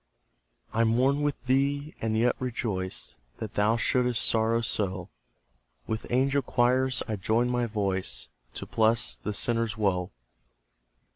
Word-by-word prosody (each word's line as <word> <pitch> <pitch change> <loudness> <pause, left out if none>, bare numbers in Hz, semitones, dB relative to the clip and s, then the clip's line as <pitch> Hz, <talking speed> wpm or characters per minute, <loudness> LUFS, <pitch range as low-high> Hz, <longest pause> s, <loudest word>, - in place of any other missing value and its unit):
I 115 - +3
mourn 130 +5 +2
with 145 -1 0
thee, 140 +3 +1
and 110 -1 0
yet 120 +2 +3
rejoice 110 -7 -3 0.2
That 110 -1 -6
thou 105 +3 +2
shouldst 125 -1 +2
sorrow 115 +1 +2
so; 95 -5 -2 0.8
With 110 +1 -4
angel 135 +3 +2
choirs 130 0 +1
I 110 - -2
join 115 +5 +1
my 120 -1 0
voice 95 - -1 0.3
To - - -5
bless 110 +1 +2
the 105 - -5
sinner's 115 +1 0
woe. 90 -4 0
115 Hz, 130 wpm, -27 LUFS, 105-125 Hz, 0.8 s, I